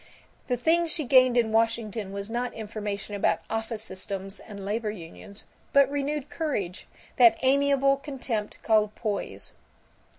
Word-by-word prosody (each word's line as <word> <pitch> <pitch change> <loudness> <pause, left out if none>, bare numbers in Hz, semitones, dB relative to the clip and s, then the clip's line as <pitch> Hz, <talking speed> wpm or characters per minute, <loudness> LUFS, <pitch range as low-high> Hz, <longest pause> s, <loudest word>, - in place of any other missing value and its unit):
The 245 - +1
thing 335 +7 +3
she 315 -1 -1
gained 255 -1 +5
in 230 -2 +3
Washington 225 -2 0
was 200 0 -4
not 240 +2 -3
information 210 -2 -5
about 200 - +1
office 225 0 -2
systems 195 -1 -4
and 200 -2 -9
labor 215 +2 -1
unions 200 +1 -8 0.3
but 280 -1 +7
renewed 285 0 -2
courage, 280 - -3 0.3
that 235 -3 +7
amiable 275 0 +4
contempt 260 -7 -4
called 215 -2 +3
poise. 210 -3 -3
225 Hz, 135 wpm, -27 LUFS, 205-275 Hz, 0.3 s, but